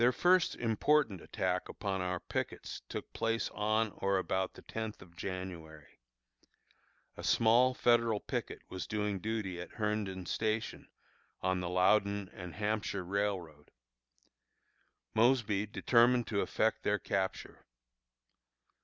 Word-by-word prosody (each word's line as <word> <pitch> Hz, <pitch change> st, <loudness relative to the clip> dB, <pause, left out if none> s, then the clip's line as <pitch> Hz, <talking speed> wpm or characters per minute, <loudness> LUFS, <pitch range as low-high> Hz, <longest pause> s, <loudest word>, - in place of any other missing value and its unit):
Their 120 Hz, +1 st, +6 dB
first 180 Hz, +6 st, +3 dB
important 115 Hz, -, +2 dB
attack 90 Hz, 0 st, -2 dB
upon 95 Hz, -2 st, -2 dB
our 90 Hz, 0 st, -1 dB
pickets -, -, -4 dB
took -, -, -6 dB
place 115 Hz, 0 st, 0 dB
on 110 Hz, +1 st, +1 dB
or 100 Hz, 0 st, +1 dB
about 95 Hz, 0 st, -1 dB
the -, -, -13 dB
tenth 110 Hz, -1 st, -5 dB
of 85 Hz, -1 st, -15 dB
January. 85 Hz, -5 st, -7 dB, 1.2 s
A -, -, -8 dB
small 120 Hz, +3 st, +4 dB
Federal 115 Hz, -3 st, +3 dB
picket -, -, -4 dB
was 90 Hz, -3 st, -5 dB
doing 105 Hz, -2 st, -1 dB
duty 100 Hz, -4 st, -3 dB
at 90 Hz, -, -9 dB
Herndon 105 Hz, -4 st, -2 dB
Station, 110 Hz, +4 st, -2 dB, 0.5 s
on 95 Hz, 0 st, +1 dB
the 90 Hz, -1 st, -3 dB
Loudon 100 Hz, +2 st, +2 dB
and 90 Hz, -2 st, -8 dB
Hampshire 105 Hz, -2 st, -1 dB
Railroad. 90 Hz, -6 st, -2 dB, 1.4 s
Mosby 110 Hz, -3 st, +3 dB
determined 120 Hz, +3 st, +4 dB
to 100 Hz, -2 st, +1 dB
effect 110 Hz, -, +1 dB
their 105 Hz, -, +1 dB
capture. 95 Hz, -2 st, -3 dB
105 Hz, 120 wpm, -33 LUFS, 95-110 Hz, 1.4 s, Their